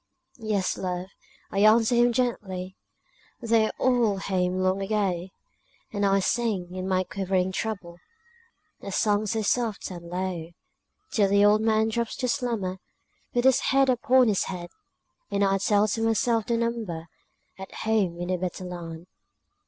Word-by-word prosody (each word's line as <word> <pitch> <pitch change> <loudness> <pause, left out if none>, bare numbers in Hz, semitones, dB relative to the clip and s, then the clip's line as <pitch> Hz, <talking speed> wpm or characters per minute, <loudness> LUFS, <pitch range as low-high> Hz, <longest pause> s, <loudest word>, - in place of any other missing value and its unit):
"Yes, 210 -4 -1
love!" 180 0 -3 0.4
I 195 - -1
answer 220 +3 +5
him 240 0 +4
gently, 190 -7 -2 0.6
"They're 225 -2 +2
all 240 -6 +2
home 185 -1 -1
long 185 +1 +1
ago;" 195 -3 -1 0.7
And 205 -1 +1
I 195 0 +3
sing, 200 -5 -1
in 185 0 -4
my 185 -1 +1
quivering 185 0 -1
treble, 190 -4 -4 0.8
A 200 - -6
song 210 +1 +1
so 220 +1 -1
soft 225 -2 -1
and 170 -1 -9
low, 175 -2 -4 0.6
Till 215 -9 +3
the 200 +1 +5
old 210 +1 +5
man 220 0 +2
drops 235 0 -2
to 255 - -2
slumber, 230 -8 -1 0.6
With 240 +1 +2
his 265 -1 +5
head 270 0 +3
upon 255 +1 +4
his 200 - +1
hand, 175 -2 -6 0.6
And 200 -1 +1
I 195 0 +2
tell 205 +1 +3
to 225 +3 -1
myself 225 0 +1
the 235 - +1
number 225 -8 -3 0.5
At 190 - -8
home 210 -6 0
in 175 +1 -4
the 185 - +1
better 185 +1 -4
land. 170 -2 -7
200 Hz, 155 wpm, -26 LUFS, 185-225 Hz, 0.8 s, answer